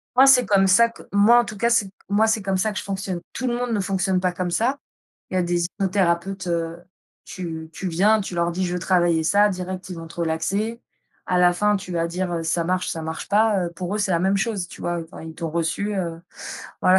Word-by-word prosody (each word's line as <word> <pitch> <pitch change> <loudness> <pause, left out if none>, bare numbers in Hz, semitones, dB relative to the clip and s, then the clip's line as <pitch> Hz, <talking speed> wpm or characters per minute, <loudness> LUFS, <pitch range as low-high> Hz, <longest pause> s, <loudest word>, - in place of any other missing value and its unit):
Moi, 260 +2 +7
c'est 255 -2 +7
comme 195 -2 +4
ça 230 +5 +5
que 230 - -14
moi 210 +4 +6
en 240 - +2
tout 210 - -8
cas, 235 +3 +2
c'est 220 -4 +2 0.2
moi, 215 +2 +3
c'est 220 -1 +1
comme 195 -1 0
ça 215 +3 +1
que 210 - -3
je - - -6
fonctionne. 190 -3 -4
Tout 260 - -3
le 240 - 0
monde 245 0 -2
ne 215 - +1
fonctionne 190 -1 0
pas 180 0 +1
comme 180 0 -3
ça. 250 +10 +1 0.5
Il - - -5
y - - +1
a - - +2
des 175 0 0
hypnothérapeutes, 190 0 -1
heu, 165 -1 -1 0.5
tu 160 -3 -6
tu 190 - -4
viens, 205 +6 +3
tu 190 -2 -5
leur 170 0 +1
dis: 185 +2 -1
«Je 175 - -2
veux - - -1
travailler 175 -3 +2
ça», 205 +4 +4
direct 185 -1 -5
ils 180 - -6
vont 165 - -8
te 165 - -14
relaxer. 190 +8 -1 0.5
À 180 - +1
la 180 0 +5
fin 210 +3 +2
tu 190 -2 -7
vas 165 -1 0
dire, 175 +1 -3
heu: 165 - -2
«Ça 165 +1 0
marche, 180 +1 0
ça 165 - -3
marche 160 0 -5
pas», 210 -2 +3
heu, 170 - -5
pour 185 +2 -4
eux 215 - -1
c'est 200 -2 0
la 170 - +3
même 190 +3 +2
chose, 195 -3 -1
tu - - -12
vois? 175 0 -1
Heu, 165 -1 -7
enfin - - -10
ils 160 0 -8
t'ont 165 -1 -4
reçu, 170 +6 -1
heu, 170 -3 -3 0.6
voilà.. 185 +1 +6
185 Hz, 260 wpm, -23 LUFS, 170-205 Hz, 0.6 s, Moi